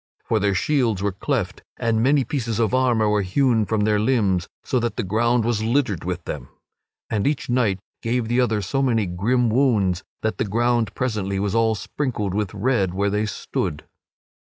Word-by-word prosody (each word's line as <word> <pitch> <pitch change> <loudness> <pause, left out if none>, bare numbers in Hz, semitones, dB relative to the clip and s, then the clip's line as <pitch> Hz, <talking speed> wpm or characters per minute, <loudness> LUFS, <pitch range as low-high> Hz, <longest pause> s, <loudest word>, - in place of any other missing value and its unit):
For 110 - +1
their 100 -1 +1
shields 115 -5 +1
were 100 - +1
cleft 100 -1 -2 0.2
and 115 -2 +1
many 135 +3 +3
pieces 120 -6 -2
of 115 0 +1
armor 120 -4 +3
were 105 0 +2
hewn 110 +2 +2
from 110 -2 0
their 105 0 +2
limbs, 105 -6 +1 0.2
so 130 - 0
that 120 0 -2
the 120 - -2
ground 115 +4 +1
was 115 -2 0
littered 115 - 0
with 90 -1 -3
them. 70 -5 -6 0.6
And 105 +1 +1
each 145 -4 -1
knight 115 -6 +2 0.2
gave 115 0 -1
the 120 +2 +2
other 110 -4 +1
so 135 +9 -1
many 115 -5 +2
grim 110 +8 +1
wounds 105 -8 +2 0.2
that 110 - -1
the - - +1
ground 115 0 +1
presently 105 -6 -1
was 100 0 -1
all 115 -1 +2
sprinkled 105 -4 -3
with 105 -2 -1
red 100 -4 +1
where 100 +1 +1
they 105 +1 0
stood. 75 -6 -3
110 Hz, 185 wpm, -22 LUFS, 100-125 Hz, 0.6 s, many